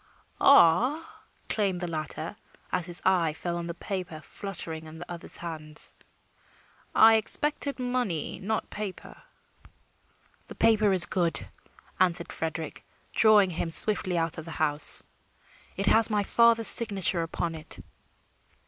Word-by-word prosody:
"Ah," 275 - +3 0.2
exclaimed 195 -4 -2
the 175 - -4
latter, 160 +2 -5 0.4
as 180 -1 -1
his 175 -1 +3
eye 175 -4 +1
fell 170 +2 -5
on 170 0 -5
the 170 - -6
paper 180 -5 -6
fluttering 160 -2 -7
in 155 +1 -12
the 175 - -9
other's 170 -1 -7
hand, 155 -2 -7 1.2
"I 225 0 +6
expected 285 +5 -1
money, 245 - -3
not 215 +3 -4
paper." 205 -3 -8 1.3
"The - - -11
paper 215 -2 +2
is 185 -2 +7
good," 170 -6 -1 0.5
answered 175 -2 +2
Frederick, 160 -1 -6 0.3
drawing 210 -4 +4
him 165 0 -4
swiftly 185 0 +4
out 165 -1 -1
of 160 - -9
the - - -10
house. 150 -1 +3 0.7
"It 195 - -2
has 225 +2 +4
my 210 -2 0
father's 230 +1 +3
signature 195 -6 +3
upon 165 0 -4
it." 155 -1 -9
180 Hz, 130 wpm, -26 LUFS, 165-215 Hz, 1.3 s, is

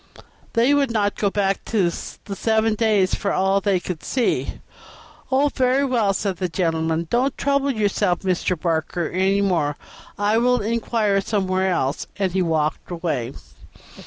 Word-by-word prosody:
they 240 +4 +4
would 280 -2 +2
not 205 -3 +1
go 200 - 0
back 195 -1 0
to 195 -6 +1 0.3
the 200 - -5
seven 220 +2 +1
days 210 -4 +2
for 200 - -1
all 195 +1 +2
they 195 -2 +1
could 175 -2 -5
see." 255 -3 -1 0.7
"Oh, 280 +2 +3
very 260 +2 +2
well," 235 -6 +2
said 195 -1 -2
the 180 0 -2
gentleman. 165 -1 0
"Don't 255 +3 +1
trouble 280 0 +1
yourself, 205 -7 0
Mr. 180 -2 0
Barker, 165 0 -1
any 190 +2 +1
further. 150 -6 0 0.4
I 210 +2 +2
will 250 +1 +3
inquire 215 -2 0
somewhere 190 -2 0
else," 135 -5 -1
and 195 -2 0
he 190 +1 0
walked 160 -3 -1
away. 165 -8 -3
195 Hz, 155 wpm, -22 LUFS, 180-225 Hz, 0.7 s, they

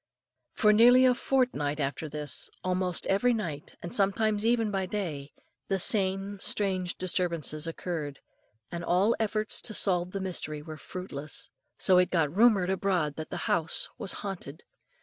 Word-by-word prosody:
For 210 -1 +4
nearly 245 +4 +7
a 255 - +5
fortnight 245 - 0
after 145 +2 -2
this, 150 -1 -4
almost 185 -1 0
every 235 +5 +2
night, 160 -9 -5
and 175 - -6
sometimes 210 +1 +1
even 230 -2 +2
by 190 -2 -1
day, 160 -9 -4 0.4
the 195 - +1
same 195 0 +2
strange 185 -3 -1
disturbances 170 -4 -1
occurred, 160 -4 -4 0.5
and 170 0 -5
all 190 +7 +3
efforts 215 -1 -1
to 215 - -5
solve 180 -2 +1
the 195 - -4
mystery 155 -5 -4
were 155 0 -8
fruitless. 155 -3 -7 0.3
So 185 -1 +5
it 180 - +3
got 165 -3 0
rumoured 205 -4 +4
abroad 180 -6 0
that 155 - -5
the - - -4
house 165 -1 +1
was 195 - -3
haunted. 175 -7 -6
185 Hz, 150 wpm, -29 LUFS, 160-205 Hz, 0.5 s, nearly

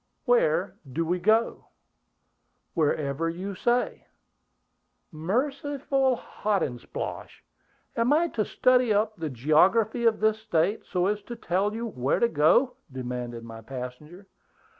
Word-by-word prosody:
"Where - - +2 0.2
do 165 +6 -1
we 180 +2 0
go?" 220 +5 +1 1.1
"Wherever 155 -1 0
you 185 +4 -5
say." 240 +6 0 1.0
"Merciful 270 - 0
Hotandsplosh! 195 - -4 0.5
Am 230 +3 +2
I 330 +3 +3
to 220 - -1
study 250 +1 +3
up 215 +1 +1
the 160 -5 -4
geography 185 - +3
of 225 -1 +3
this 220 0 +2
State, 200 -1 0
so 180 0 0
as 210 +1 0
to 240 +4 -8
tell 200 0 -1
you 230 +1 -3
where 135 - -1
to 235 - +4
go?" 240 - +3
demanded 125 -2 -5
my 115 -1 -9
passenger. 135 - -8
200 Hz, 120 wpm, -27 LUFS, 155-235 Hz, 1.1 s, to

